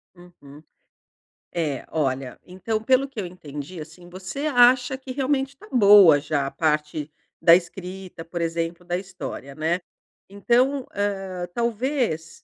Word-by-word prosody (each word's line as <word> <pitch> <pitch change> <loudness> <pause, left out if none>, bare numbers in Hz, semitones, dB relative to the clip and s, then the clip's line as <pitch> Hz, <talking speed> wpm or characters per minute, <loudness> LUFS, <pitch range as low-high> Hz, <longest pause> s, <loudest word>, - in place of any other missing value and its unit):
Uhum. 165 -4 -16 0.9
É, 155 -6 -2
olha, 135 -4 -2
então 215 +4 -3
pelo 260 +4 +3
que 265 -5 -8
eu 190 - -2
entendi, 155 -1 -8
assim, 170 +3 -12
você 185 +11 -6
acha 250 0 +4
que, 265 -1 -9
realmente, 270 0 0
está 275 +10 -17
boa 200 - +7
já 145 -2 -1
a - - -5
parte 150 -1 -1 0.3
da 170 0 +8
escrita, 185 0 -5
por 170 +1 -6
exemplo, 165 +1 -3
da 175 0 -1
história, 185 -7 -7
né. 165 +4 -1 0.5
Então, 250 +7 +1
hã, 195 -3 -2
talvez 235 - -1
180 Hz, 135 wpm, -24 LUFS, 160-235 Hz, 0.9 s, da